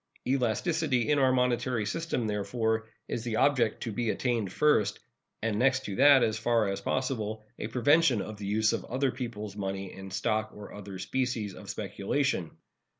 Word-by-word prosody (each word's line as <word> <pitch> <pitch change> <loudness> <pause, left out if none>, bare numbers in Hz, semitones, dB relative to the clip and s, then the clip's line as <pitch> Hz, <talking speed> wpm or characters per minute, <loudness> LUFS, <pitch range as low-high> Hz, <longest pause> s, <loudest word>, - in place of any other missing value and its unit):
Elasticity 135 +2 +1
in 145 - +3
our 130 -1 +4
monetary 125 -2 +1
system, 160 +1 -2
therefore, 110 +2 -1 0.2
is 115 - -3
the 120 -2 -2
object 125 -4 +2
to 115 - -3
be 115 +2 -1
attained 115 -5 0
first, 150 -4 +2 0.4
and 110 -2 0
next 130 0 +2
to 100 - -4
that, 140 -2 +7
as 110 0 0
far 115 -2 +2
as 100 0 -3
possible, 110 -2 -2
a - - -3
prevention 130 +2 +4
of 110 +1 -5
the 100 -1 -6
use 110 +2 +2
of - - -2
other 130 +2 0
people's 115 -5 -6
money 95 -1 -4
in 95 0 -9
stock 110 +3 -1
and 105 -1 -10
other 100 -2 -8
species 115 0 -2
of - - -11
speculation. 100 - -1
115 Hz, 170 wpm, -29 LUFS, 105-130 Hz, 0.4 s, that